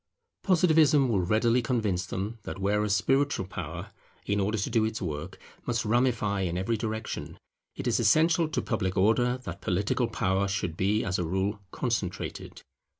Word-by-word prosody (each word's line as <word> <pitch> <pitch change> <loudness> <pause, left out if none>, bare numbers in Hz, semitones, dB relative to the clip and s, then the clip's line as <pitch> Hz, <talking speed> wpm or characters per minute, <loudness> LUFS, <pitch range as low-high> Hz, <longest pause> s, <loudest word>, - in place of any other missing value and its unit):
Positivism 160 -7 +4
will 100 -5 +2
readily 115 +6 +2
convince 105 -7 -1
them 100 +5 -4
that - - -6
whereas 100 +1 +1
spiritual 135 +1 +1
power, 95 - -6 0.3
in 100 0 0
order 105 +3 0
to 100 - -2
do 115 - +3
its 110 0 -2
work, 75 -5 -5 0.3
must 115 -2 0
ramify 110 -3 +1
in 90 -2 -1
every 95 +5 0
direction, 110 0 -4 0.4
it - - -6
is 120 -1 +2
essential 160 +8 +3
to - - -2
public 100 -5 -1
order 120 +6 +3
that - - -7
political 100 +6 0
power 95 0 0
should 90 -4 -2
be 100 +5 +1
as 95 -1 -1
a - - 0
rule 95 +5 -1
concentrated. 110 -7 -4
110 Hz, 160 wpm, -28 LUFS, 95-120 Hz, 0.4 s, Positivism